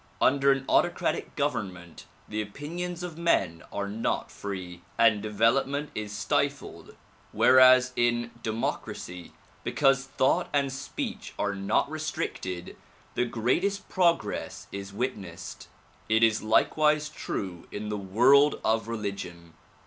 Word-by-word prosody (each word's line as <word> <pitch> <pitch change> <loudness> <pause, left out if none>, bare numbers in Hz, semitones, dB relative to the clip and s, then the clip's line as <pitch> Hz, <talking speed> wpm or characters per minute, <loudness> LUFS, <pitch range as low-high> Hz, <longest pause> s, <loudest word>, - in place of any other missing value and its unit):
Under 140 0 +4
an 135 -1 0
autocratic - - +1
government 90 -5 -3 0.2
the 110 0 -2
opinions 170 - -5
of 170 -2 -6
men 95 - +1
are 100 0 -3
not 105 +3 -2
free, 90 -3 -6 0.2
and 115 -3 +4
development 115 +7 +1
is 105 -1 -4
stifled 105 - -2 0.4
whereas 130 0 +6
in 120 0 +1
democracy, 100 -5 -4 0.3
because 135 -2 +2
thought 135 0 +1
and 140 -2 +1
speech 225 - -5
are 100 0 0
not 100 0 +1
restricted 90 -1 -4 0.4
the 125 - +1
greatest 130 - 0
progress 170 - 0
is 100 0 -6
witnessed. 100 -5 -5 0.4
It 110 +1 +4
is 110 -1 +4
likewise 150 +7 +3
true 95 - -5
in 105 +1 -5
the 105 - -2
world 125 +9 +4
of 110 0 +1
religion. 100 -7 -5
115 Hz, 120 wpm, -28 LUFS, 100-140 Hz, 0.4 s, whereas